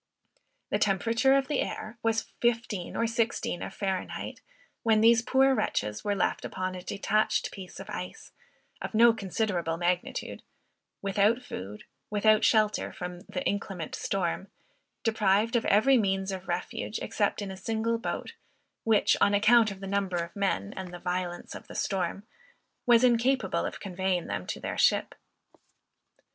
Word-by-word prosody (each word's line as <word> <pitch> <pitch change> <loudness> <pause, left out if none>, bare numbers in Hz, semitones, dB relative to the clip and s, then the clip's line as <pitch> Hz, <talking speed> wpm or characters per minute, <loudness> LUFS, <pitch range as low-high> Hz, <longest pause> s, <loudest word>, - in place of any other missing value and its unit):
The - - +1
temperature 230 +7 +3
of 270 -1 0
the 290 - 0
air 220 +2 -5
was 225 0 0
15 230 -6 0
or 230 - +1
16 230 -6 -1
of - - -5
Fahr. 190 -1 -1 0.8
when 220 -2 +3
these 230 +1 +6
poor 265 +3 +4
wretches 105 - -1
were 205 -1 0
left 190 - 0
upon 185 0 -3
a 180 - -6
detached 205 +3 0
piece 190 -2 -9
of 195 - -8
ice, 180 -3 -7 0.5
of - - -5
no 230 +1 +7
considerable 190 -5 -1
magnitude, 175 +1 -2 0.6
without 205 +5 +2
food, 100 - -7 0.3
without 215 +1 +4
shelter 215 -2 +3
from 180 0 -6
the 275 - -3
inclement 195 -5 -3
storm, 190 0 -2 0.6
deprived 220 0 +2
of 235 - +2
every 250 +6 +5
means 195 -2 0
of 190 -1 -6
refuge 180 +4 -3
except 205 -1 -1
in 200 -2 -4
a - - -6
single 225 +4 -1
boat, 230 - -4 0.5
which, 220 -2 +4
on 205 0 +5
account 220 +2 +5
of 195 -1 -8
the - - -5
number 195 -2 0
of 170 0 -4
men, 190 - -1
and 190 -2 -6
the 175 - -7
violence 180 0 -3
of - - -10
the - - -10
storm, 195 +1 -2 0.6
was 240 0 +6
incapable 240 -3 +2
of - - -7
conveying 185 -2 -1
them 90 - -4
to - - -4
their - - -4
ship. - - +3
200 Hz, 155 wpm, -28 LUFS, 185-225 Hz, 0.8 s, no